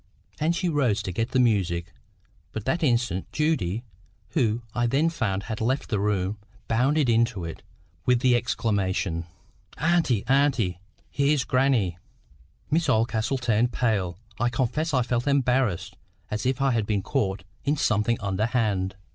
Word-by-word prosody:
And 160 +3 +1
she 180 - -1
rose 135 -10 +1
to 95 - -3
get 115 +6 -1
the 130 - +1
music. 90 -8 +1 0.6
But 110 -2 -5
that 160 +7 0
instant 120 - 0
Judy, 120 - 0 0.5
who, 120 -5 0
I 120 0 +1
then 145 +7 +2
found, 100 -10 -1
had 110 0 -5
left 130 +5 0
the 105 - +1
room, 100 0 0 0.3
bounded 135 +5 +2
into 115 -5 +2
it, 80 - -7 0.4
with 125 -1 +3
the 125 -1 +4
exclamation,— 100 -7 -1 0.5
"Auntie, 160 - +2
auntie! 130 -10 +2 0.3
here's 140 -1 +2
grannie!" 125 -11 +1 0.7
Miss 160 -1 +2
Oldcastle 115 +2 +1
turned 120 -1 +1
pale. 100 -8 0 0.2
I 120 - +2
confess 130 +7 -1
I 130 -4 +2
felt 120 +2 -1
embarrassed, 130 -8 +1 0.4
as 105 +3 -1
if 130 +1 0
I 135 - +3
had 115 -4 0
been 100 -3 0
caught 100 -8 -1 0.2
in 145 +2 +1
something 110 -1 +1
underhand. 100 -1 0
120 Hz, 145 wpm, -26 LUFS, 100-135 Hz, 0.7 s, the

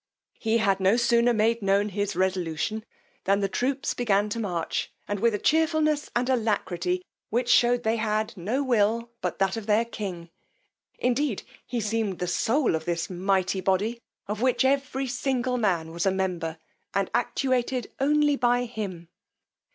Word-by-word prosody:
He 225 0 +2
had 200 -4 +2
no 190 +4 +4
sooner 235 0 +4
made 230 +1 +2
known 200 +1 +2
his 205 -1 -2
resolution, 185 +3 -1 0.4
than 195 +1 +3
the 200 - +1
troops 265 +7 -1
began 210 -3 +1
to 230 - -3
march, 175 -7 -2 0.2
and 205 -1 -2
with 230 0 +3
a - - 0
chearfulness 310 - +2
and 245 +1 +1
alacrity, 185 -7 0 0.2
which 240 +2 0
shewed 240 0 +4
they 225 +1 +1
had 215 -1 -1
no 215 +10 -1
will 230 -1 +1
but - - -2
that 195 +1 +1
of 225 -2 -6
their 220 +2 +3
king: 180 -7 -6 0.7
indeed 250 -2 0 0.2
he 240 0 -2
seemed 215 -3 -1
the 180 - -2
soul 235 - +1
of 160 0 -2
this 170 +2 -2
mighty 190 +1 0
body, 205 +5 0 0.3
of 210 +2 -3
which 255 +1 +2
every 270 0 +1
single 255 -1 -1
man 175 -7 0
was 170 +3 -1
a - - +4
member, 180 -4 -2 0.4
and 195 -1 0
actuated 250 0 0
only 295 +1 +3
by 245 -2 +2
him. 200 -8 -6
220 Hz, 160 wpm, -26 LUFS, 190-245 Hz, 0.7 s, no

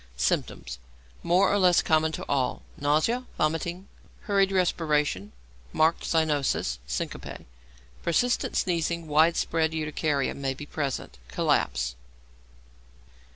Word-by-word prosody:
Symptoms - - -1 0.4
(more 180 +4 +3
or 205 - +3
less 180 -2 +5
common 160 -1 +2
to - - -5
all). 130 -3 0
Nausea, 155 - +1
vomiting, 170 +5 -1 0.3
hurried 195 -2 +2
respiration, 150 - +1 0.4
marked 160 +1 +2
cyanosis, 145 - +1
syncope. 60 0 -5 0.6
Persistent 240 +9 +1
sneezing 170 -1 0
and 160 - -13
widespread 160 +1 +3
urticaria 150 -2 -1
may 135 -1 -3
be 145 - -8
present; 140 - -4
collapse. 65 0 0
155 Hz, 105 wpm, -27 LUFS, 140-170 Hz, 0.6 s, less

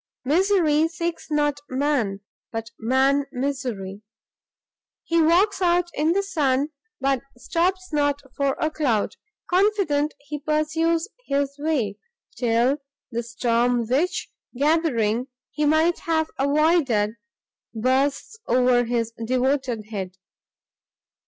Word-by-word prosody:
Misery 325 -1 +3
seeks 335 0 -4
not 295 -1 +1
man, 255 -8 0 0.3
but 225 0 -5
man 265 +4 +2
misery. 250 -8 -3 1.0
He 335 0 +2
walks 365 +5 +3
out 350 -1 +2
in 310 +3 +2
the 395 +2 +1
sun, 290 -6 +1 0.3
but 270 -2 +1 0.2
stops 365 +6 -1
not 290 -1 +2 0.2
for 280 -1 +1
a 315 - 0
cloud; 255 -10 0 0.3
confident, 360 -6 +2
he 295 +1 -6
pursues 320 +3 0 0.2
his 280 0 0
way, 260 -10 -1 0.4
till 245 +4 +2 0.3
the 235 0 -1
storm 235 +1 +1
which, 275 +10 0 0.3
gathering, 260 -6 +1 0.2
he 300 +1 -1
might 315 +3 +3
have 320 -1 0
avoided, 280 -7 +3 0.6
bursts 270 - 0
over 245 0 +3
his 230 -1 -1
devoted 255 -2 0
head. 190 -3 -5
285 Hz, 105 wpm, -24 LUFS, 245-320 Hz, 1.0 s, Misery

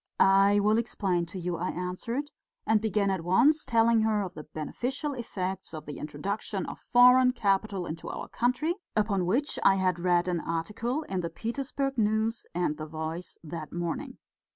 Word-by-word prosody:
"I 195 +1 +5
will 210 +2 +3
explain 190 -7 -1
to 170 - -7
you," 175 -1 -2
I 180 +3 -2
answered, 230 +11 -3 0.3
and 220 -1 +3
began 210 -2 +1
at 185 -4 -2
once 275 - +4
telling 230 -1 +3
her 215 -2 +2
of 185 -2 -6
the 155 - -9
beneficial 250 - -3
effects 190 -8 -4
of 155 - -8
the 145 - -7
introduction 190 +6 -3
of - - -7
foreign 250 +1 +7
capital 195 -3 0
into 160 0 -6
our - - -5
country, 250 +8 0 0.2
upon 205 -4 +1
which 260 +10 0
I 195 - +5
had 185 -2 +1
read 175 0 +2
an 175 -2 0
article 215 - -2
in 190 -9 -3
the 170 - -3
Petersburg 270 - -3
News 220 +1 +1
and 175 -4 0
the 155 - -6
Voice 160 +3 -5
that 160 -1 -7
morning. 175 -1 -4
195 Hz, 175 wpm, -28 LUFS, 175-230 Hz, 0.3 s, foreign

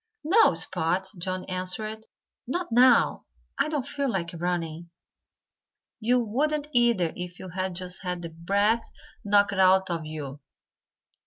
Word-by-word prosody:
"No, 345 - +5
Spot!" 180 +2 +1
Johnnie 185 +1 -4
answered. 215 +4 -4 0.4
"Not 350 +5 -3
now! 250 +2 +4 0.3
I 280 +2 +2
don't 295 -5 -2
feel 280 -1 -2
like 170 -6 -2
running. 170 -1 -3 1.1
You 240 +3 +2
wouldn't, 290 +6 -1
either, 235 -9 +3
if 180 0 -7
you 185 - -9
had 185 +1 -3
just 180 0 -5
had 180 -2 -4
the 165 - -5
breath 200 +7 0 0.3
knocked 205 -1 +3
out 190 0 +4
of 165 -2 -3
you." 145 -3 -6
190 Hz, 135 wpm, -26 LUFS, 175-235 Hz, 1.1 s, No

